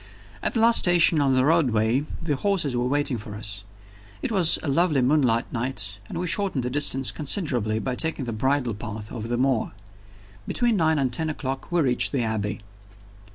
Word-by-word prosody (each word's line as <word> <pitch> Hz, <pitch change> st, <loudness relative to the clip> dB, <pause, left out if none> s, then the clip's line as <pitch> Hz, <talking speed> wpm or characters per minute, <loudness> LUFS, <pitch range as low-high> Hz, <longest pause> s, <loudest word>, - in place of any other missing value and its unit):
At -, -, -3 dB
the -, -, +2 dB
last 230 Hz, 0 st, +6 dB
station 175 Hz, -3 st, +4 dB
on 135 Hz, -2 st, +2 dB
the 130 Hz, 0 st, +2 dB
railway 130 Hz, -5 st, +1 dB, 0.2 s
the 150 Hz, -3 st, -1 dB
horses 170 Hz, -5 st, -1 dB
were 120 Hz, +1 st, 0 dB
waiting 140 Hz, -2 st, 0 dB
for 105 Hz, 0 st, -9 dB
us. 105 Hz, -2 st, -5 dB, 0.6 s
It -, -, -2 dB
was 185 Hz, -6 st, +7 dB
a -, -, -4 dB
lovely 145 Hz, -1 st, +2 dB
moonlight 125 Hz, -4 st, +1 dB
night, 115 Hz, -5 st, -3 dB
and -, -, -6 dB
we 180 Hz, -, -3 dB
shortened 180 Hz, -6 st, +1 dB
the 125 Hz, -, -3 dB
distance 135 Hz, -4 st, +2 dB
considerably 130 Hz, -, -2 dB
by 130 Hz, +3 st, -3 dB
taking 160 Hz, -2 st, -2 dB
the 120 Hz, -, -4 dB
bridle 130 Hz, +1 st, 0 dB
path 105 Hz, 0 st, -8 dB
over 115 Hz, -2 st, -6 dB
the 120 Hz, 0 st, -2 dB
moor. 130 Hz, -4 st, 0 dB, 0.7 s
Between 240 Hz, -2 st, +1 dB
nine 160 Hz, -4 st, +2 dB
and 130 Hz, -3 st, -1 dB
ten 160 Hz, +6 st, -1 dB
o'clock 135 Hz, -2 st, -5 dB
we 175 Hz, -1 st, +2 dB
reached 130 Hz, -1 st, 0 dB
the 130 Hz, -4 st, 0 dB
Abbey. 110 Hz, -2 st, -3 dB
135 Hz, 190 wpm, -24 LUFS, 115-160 Hz, 0.7 s, was